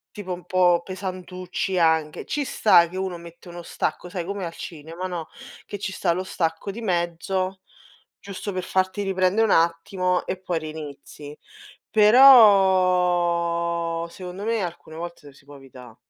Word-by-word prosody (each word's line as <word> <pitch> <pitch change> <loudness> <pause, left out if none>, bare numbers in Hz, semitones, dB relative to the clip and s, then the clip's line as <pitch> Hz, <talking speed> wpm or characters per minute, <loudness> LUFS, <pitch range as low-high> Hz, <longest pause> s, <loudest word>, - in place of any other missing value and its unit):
Tipo 195 -3 -6
un 180 -1 -7
po' 180 -2 +3
pesantucci 185 0 -5
anche. 160 -3 +1
Ci 295 -1 -2
sta 175 -9 +4
che 180 - -10
uno 190 -1 -3
mette 170 +1 -14
uno 175 0 -9
stacco, 180 - -4
sai 180 -1 -5
come 200 +1 -5
al 165 - -6
cinema, 165 +3 -7
no? 170 -3 -5 0.4
Che - - -6
ci 200 - -3
sta 185 -2 0
lo 180 +2 -2
stacco 165 0 -3
di 215 +4 -7
mezzo 185 0 -2 0.6
giusto 200 0 -7
per 185 -1 -4
farti 185 +2 -1
riprendè 190 +1 +1
un 220 - +2
attimo 180 +2 +1
e - - -3
poi 180 -2 -3
rinizi. 150 -1 -9 0.5
Però, 180 -7 +4
secondo 180 +3 -9
me 225 -1 0
alcune 170 -2 -7
volte 170 -2 -8
lo 145 - -13
si 140 - -22
può 145 0 -13
evità. 125 -4 -14
180 Hz, 155 wpm, -23 LUFS, 170-190 Hz, 0.6 s, sta